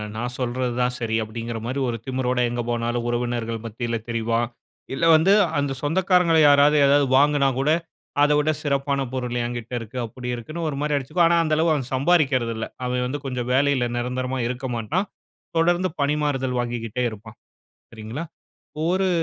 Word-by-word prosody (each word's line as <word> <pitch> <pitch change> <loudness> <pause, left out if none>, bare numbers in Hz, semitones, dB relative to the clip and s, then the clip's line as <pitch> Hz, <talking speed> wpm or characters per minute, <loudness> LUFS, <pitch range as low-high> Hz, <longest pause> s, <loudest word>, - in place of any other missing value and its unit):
நான் 120 +2 -3
சொல்றது 125 0 -1
தான் 125 0 +1
சரி 110 -1 -1
அப்படிங்குற 115 +1 -5
மாதிரி 130 +3 -2
ஒரு 115 - -2
திமிரோடு 130 -1 0
எங்கு 120 0 -2
போனாலும் 120 0 -1
உறவினர்கள் 120 -2 -2
மத்தியில 115 +1 -3
தெரிவான். 115 0 0 0.4
இல்ல 165 - 0
வந்து 170 +5 +4 0.3
அந்த 140 -1 -1
சொந்தக்காரர்களை 170 +1 +3
யாராவது 145 +1 +6
ஏதாவது 140 0 +4
வாங்குனா 145 -1 +4
கூட 140 +3 +1 0.5
அத 150 - +4
விட 150 +1 +1
சிறப்பான 140 -1 0
பொருள் 125 -1 -2
என்கிட்ட 120 0 -5
இருக்கு. 115 +3 -9
அப்படி 125 +2 -8
இருக்குன்னு 155 +8 -5
ஒரு 140 - -4
மாதிரி 150 -1 0
அடிச்சிக்குவான். 165 +5 +2
ஆனா, 170 - +4
அந்த 155 -1 0
அளவு 160 0 +3 0.2
சம்பாரிக்குறதுல்ல. 130 -6 +2 0.2
அவன் 125 0 -1
வந்து 145 +3 -3
கொஞ்சம் 125 -2 -3
வேலையில 135 -2 +2
நிரந்தரமா 125 +2 -2
இருக்க 125 +1 -4
மாட்டான். 160 - -1 0.5
தொடர்ந்து 175 +2 +2
பணிமாறுதல் 140 -3 0
வாங்கிக்கிட்டே 120 0 -3
இருப்பான். 110 +1 -11 0.6
சரிங்களா. 115 +7 -6 0.6
ஒரு 185 +2 +2
130 Hz, 155 wpm, -23 LUFS, 120-145 Hz, 0.6 s, யாராவது